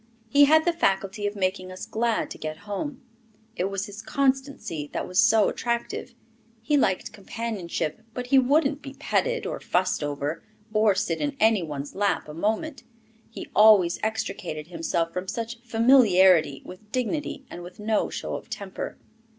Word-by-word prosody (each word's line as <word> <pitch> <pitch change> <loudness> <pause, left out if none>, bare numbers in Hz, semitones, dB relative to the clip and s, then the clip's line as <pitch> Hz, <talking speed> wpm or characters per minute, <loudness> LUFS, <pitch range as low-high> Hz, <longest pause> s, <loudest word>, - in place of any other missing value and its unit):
He 285 +4 +7
had 315 +2 +5
the 345 - +3
faculty 195 - 0
of 205 - -4
making 185 -1 -2
us 185 - -7
glad 230 0 -1
to - - -8
get 155 +5 -6
home. 255 +7 -5 0.5
It 180 - -1
was 195 0 -2
his 205 0 -9
constancy 265 - -1
that - - -3
was 180 0 0
so 225 -3 +5
attractive. 235 0 -3 0.5
He 295 +6 +2
liked 225 -5 +1
companionship, 200 -5 -4
but 250 - -3
he 265 +2 +5
wouldn't 280 +2 +2
be 275 -1 -9
petted, - - 0
or - - -3
fussed 180 -3 0
over, 145 +2 -3 0.3
or 215 -2 +4
sit 175 -4 -1
in 285 -1 -2
any 220 -2 +4
one's 145 -3 -5
lap 200 -4 0
a 150 - -8
moment; 220 - -2 0.5
he - - -9
always 205 -5 +6
extricated 175 -7 -3
himself 165 -1 -1
from 180 +1 -4
such 230 +3 -4
familiarity 215 - +4
with 210 +4 -12
dignity 270 +3 -2
and 175 - -7
with 175 +3 -11
no 215 +1 0
show - - -5
of - - -6
temper. - - -6
215 Hz, 165 wpm, -26 LUFS, 180-255 Hz, 0.5 s, He